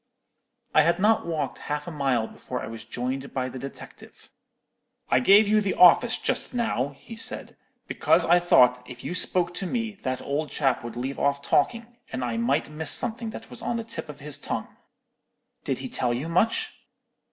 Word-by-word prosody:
"I - - +7
had 170 +2 +2
not 215 0 +2
walked 155 -5 -3
half 150 0 -4
a 175 - -6
mile 135 -7 0
before 125 +2 -6
I - - -5
was 115 -1 -8
joined 130 +4 -4
by 130 -1 -1
the 130 - -8
detective. 140 +2 -11 0.8
"'I - - +5
gave 200 +10 +6
you 215 +1 +3
the 200 -2 -1
office 180 -1 +6
just - - -1
now,' 145 - -1
he 230 - -11
said, 225 - -5 0.3
'because - - +3
I 175 +1 +5
thought 125 -8 +4
if 125 -1 -10
you - - -4
spoke 180 -1 +1
to 190 - -3
me, 230 +1 -2
that 130 -1 -2
old 145 +2 -3
chap 135 -5 0
would 120 -1 -7
leave 130 +3 -4
off 140 0 0
talking, 230 +13 +1 0.3
and 130 -1 -3
I 115 -2 -2
might 130 +6 +1
miss 155 +1 -4
something 230 -1 +1
that 225 +1 -10
was - - -9
on 235 0 -2
the 230 - -3
tip 225 -8 -6
of 145 -1 -10
his 150 0 -1
tongue.' - - -4 0.9
"'Did - - -1
he - - -2
tell 120 -1 -1
you 135 +7 -4
much?' 225 - +1
150 Hz, 195 wpm, -26 LUFS, 130-200 Hz, 0.9 s, I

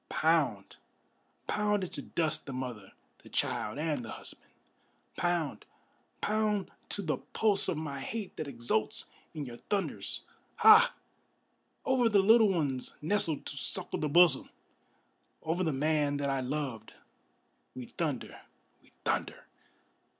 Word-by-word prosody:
Pound, - - +1 0.7
pound 210 -1 +1
into 180 - -5
dust 160 -2 -1
the 135 - -5
mother, 125 -6 -6 0.3
the - - -15
child, 105 +3 -1
and 150 -4 -1
the 110 - -8
husband! - - -9 0.7
Pound, 175 -5 -1 0.6
pound 210 -2 0 0.2
to 205 - -2
the 155 -3 0
pulse 210 -3 +1
of 165 - 0
my 145 -3 -4
hate 205 +7 -5
that 155 - -4
exults 120 -4 -1 0.2
in 150 -2 -4
your 120 -2 -8
thunders! 200 +7 -2 0.3
Ha! 440 0 +7 0.9
Over 255 -3 +3
the 210 - +4
little 220 +2 +6
ones 145 -8 -1
nestled 160 -1 0
to - - -3
suckle 135 - -2
the 150 - -1
bosom, 170 -3 +5 0.9
Over 170 +3 0
the 160 - +1
man 145 0 +1
that 140 -1 -1
I 135 -1 0
loved, 130 -5 -4 0.8
we 125 - -6
thunder, 145 -3 -4 0.4
we - - -25
thunder! - - -1
155 Hz, 130 wpm, -31 LUFS, 135-195 Hz, 0.9 s, Ha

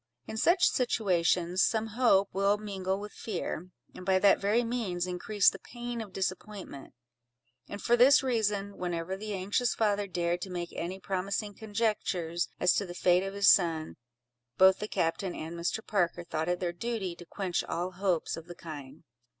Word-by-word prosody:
In - - -7
such 345 - +4
situations, 185 -6 +1
some 220 -1 +2
hope 210 -4 +3
will 200 +2 +2
mingle 195 -2 -3
with 210 0 -7
fear; 185 -4 -5 0.2
and - - -10
by 190 0 +3
that 195 +1 +5
very 210 +4 +2
means 220 -7 -2
increase 195 +3 0
the 195 - +5
pain 240 +2 -6
of 210 -3 -8
disappointment; 190 -5 -5 0.7
and 205 - -6
for 240 - +3
this 260 +4 +6
reason, 210 -5 0
whenever 175 0 -3
the 210 +1 -5
anxious 205 +6 0
father 205 -2 +1
dared 175 -1 -1
to 190 - -5
make 175 -1 -5
any 185 +3 -4
promising 200 +2 -2
conjectures 205 -6 -1
as - - +4
to 200 - 0
the 175 - -8
fate 180 0 +3
of 195 +1 -5
his 200 0 +7
son, 165 -4 +1 0.6
both 190 0 +6
the 210 - -3
captain 175 0 -1
and 160 +2 -6
Mr. 170 +6 -2
Parker 175 -4 0
thought 160 0 -3
it 180 0 0
their 175 -1 -2
duty 200 -3 -3
to 175 - -11
quench 190 -4 -2
all 175 +2 -3
hopes 185 -2 -1
of 165 +1 -10
the 175 - -9
kind. 145 -6 -9
190 Hz, 175 wpm, -30 LUFS, 175-210 Hz, 0.7 s, his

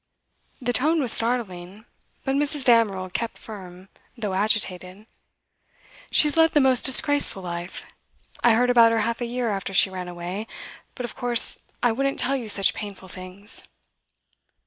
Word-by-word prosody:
The 245 -1 -3
tone 310 +6 +1
was 250 -6 +2
startling, 215 -4 -1 0.4
but 270 - -1
Mrs. 290 -1 +1
Damerel 205 -6 +2
kept 230 +4 -4
firm, 185 -3 -12 0.3
though 210 -4 -4
agitated. 190 -1 -1 1.0
'She - - +5
has 295 - +1
led 325 0 +3
the 295 - +4
most 260 -3 +3
disgraceful 275 -6 +4
life. 175 +1 -7 0.6
I 235 - +5
heard 245 +2 +2
about 230 -2 +5
her 225 -1 0
half 230 +3 -3
a - - -1
year 240 -1 -3
after 195 -1 -5
she 190 0 +3
ran 185 -1 -7
away, 180 +5 -7 0.5
but 250 - -5
of 235 - -8
course 245 -2 +1 0.2
I 240 - +3
wouldn't 275 +4 -2
tell 265 +3 -1
you 240 -5 -5
such 195 -1 +3
painful 200 -3 -9
things. 185 +3 -3
225 Hz, 160 wpm, -23 LUFS, 190-245 Hz, 1.0 s, She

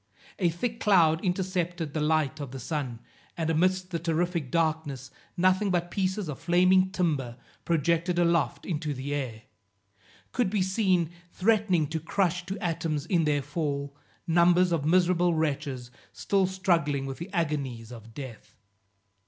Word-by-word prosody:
A 180 -3 +3
thick 225 +8 -3
cloud 165 -6 +4
intercepted 180 -4 -1
the 155 - -1
light 155 -2 +1
of 140 -3 -5
the 135 +1 -7
sun, 130 -4 -4 0.4
and 160 -1 0
amidst 185 +3 +1
the 170 - -1
terrific 170 -2 -1
darkness 155 -4 -1 0.3
nothing 185 +3 +3
but 175 -1 0
pieces 190 -1 -1
of 150 - -5
flaming 185 +2 +4
timber, 150 -10 -1 0.3
projected 170 +2 +1
aloft 170 -6 +1
into 150 -4 -2
the 135 +2 -4
air, 120 -6 -4 0.9
could 245 -6 +1
be 200 -1 +1
seen, 185 -4 +1 0.2
threatening 195 -5 +2
to 160 +2 -3
crush 180 +2 -1
to 195 +2 -3
atoms 165 -4 -2
in 170 -3 +2
their 145 -2 +1
fall, 140 -1 -3 0.3
numbers 175 +1 +4
of 160 -4 0
miserable 175 0 +3
wretches 140 -5 -2 0.2
still 195 -2 +1
struggling 170 -7 0
with 135 -1 -6
the 170 +4 -7
agonies 140 - -2
of 115 -1 -12
death. 130 -6 -9
165 Hz, 145 wpm, -28 LUFS, 145-185 Hz, 0.9 s, cloud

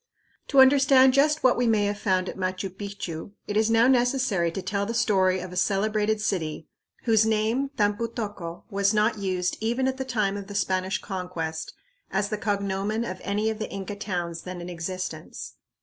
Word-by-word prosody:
To 275 - +3
understand 265 -1 +6
just 300 +3 +3
what 255 - +5
we 245 -1 +1
may 215 -2 +3
have 205 0 -2
found 185 -3 +1
at - - -5
Machu 185 0 -2
Picchu 200 -3 -6
it 205 - -4
is 220 +1 +3
now 225 +1 +5
necessary 245 -8 +2
to 190 - -4
tell 200 +2 -1
the 230 - -3
story 190 -5 +3
of 180 0 -7
a - - -7
celebrated 210 +3 +1
city, 165 -7 -2 0.4
whose 220 -2 +4
name, 220 +5 +1
Tampu 205 +2 +1
tocco, 205 -7 -6
was 200 +1 +2
not 215 +1 +2
used 185 -2 -1
even 240 +4 0
at 265 0 -1
the 265 - -2
time 210 -6 -1
of 200 -1 -7
the 205 - -8
Spanish 190 -1 0
Conquest 180 -5 -5 0.3
as 200 +1 0
the 215 -1 -3
cognomen 200 +2 -1
of 185 -4 -6
any 210 +2 0
of 220 - -6
the 220 - -3
Inca 200 +1 -5
towns 175 -5 -4
then 180 -1 -7
in 175 +1 -7
existence. 185 +2 -5
205 Hz, 190 wpm, -26 LUFS, 185-225 Hz, 0.4 s, understand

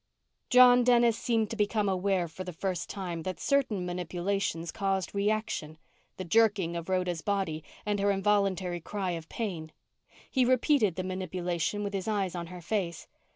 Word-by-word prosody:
_ - - -49
John 250 -1 +7
Dennis 240 -2 +4
seemed 225 -3 0
to - - -3
become 210 -1 +1
aware 190 -1 +1
for 165 +4 -7
the 180 -1 -7
first 180 +1 -3
time 180 -4 -4
that 185 +2 -5
certain 245 -10 +1
manipulations 175 -1 -2
caused 195 -2 -1
reaction 200 -6 -1 0.4
the 185 - -5
jerking 200 -3 +3
of 170 +1 -5
Rhoda's 180 -3 0
body 190 -6 -1 0.2
and 205 -1 0
her 200 +1 +2
involuntary 195 -3 +1
cry 195 +1 -3
of 165 -2 -6
pain. 175 -9 -4 0.6
He 260 - +3
repeated 255 - +3
the 185 - -3
manipulation 185 +1 -2
with 200 0 -3
his 195 0 -3
eyes 200 -4 0
on 170 -1 -5
her 180 0 -9
face. 175 -4 -2
190 Hz, 165 wpm, -29 LUFS, 175-210 Hz, 0.6 s, John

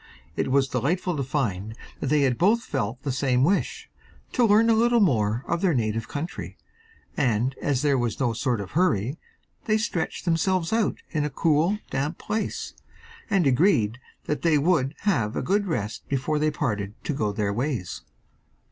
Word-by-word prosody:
It - - -1
was 135 +1 +3
delightful 165 +8 -1
to 140 - -2
find 110 -7 -2 0.2
that - - -3
they 145 0 +3
both 210 - +2
felt 130 - -3
the 140 - -1
same 130 -1 +1
wish 190 +7 0 0.4
to 245 - +2
learn 220 +1 +5
a - - +5
little 235 +2 +4
more 115 - +2
of 170 0 -1
their 180 -6 +2
native 110 -2 -1
country 155 +4 -6 0.6
and 120 +1 +1
as 140 -2 0
there 140 -3 +3
was 120 -3 -2
no 125 -4 +1
sort 120 -2 -1
of 95 - -8
hurry 140 - +1 0.5
they 215 0 +3
stretched 200 -7 -2
themselves 175 +2 +1
out 225 -2 0
in 155 -3 0
a 150 - -1
cool, 160 +7 +2
damp 145 +5 -2
place, 215 +1 -3 0.6
and 190 -4 +2
agreed 125 - +3 0.2
that 150 - -2
they 165 -3 +3
would 145 -2 +1
have 115 - +1
a - - -1
good 205 +1 +1
rest 110 - -3
before 140 +3 0
they 155 +1 +2
parted 110 - -2
to 150 - -2
go 105 -6 -1
their 100 0 -1
ways. 120 -5 -3
145 Hz, 175 wpm, -25 LUFS, 120-175 Hz, 0.6 s, learn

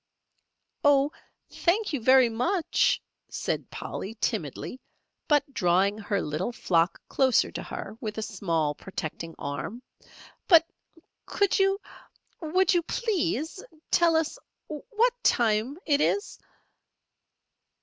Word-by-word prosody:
"O, 285 0 +4 0.4
thank 385 +1 +1
you 280 - -1
very 260 +1 +6
much," 315 - +1 0.3
said - - -3
Polly, 210 +4 -6
timidly, 215 - -3 0.5
but 295 -1 +2
drawing 190 +2 +2
her 200 -2 -1
little 155 +9 -2
flock 170 -6 +1
closer 260 -2 +3
to - - -5
her - - -7
with 215 -2 -4
a 220 - -2
small 165 -8 -1
protecting 165 -1 -6
arm; 200 - -5 0.6
"but 335 -3 +7 0.6
could 405 -1 +1
you 390 0 +3 0.6
would 360 +3 +2
you 350 - +3
please 345 - -2 0.3
tell 335 -1 +4
us 320 -1 0 0.3
what 445 +10 0
time 230 +4 +2
it 290 -1 +2
is?" 405 - 0
260 Hz, 110 wpm, -27 LUFS, 200-335 Hz, 0.6 s, but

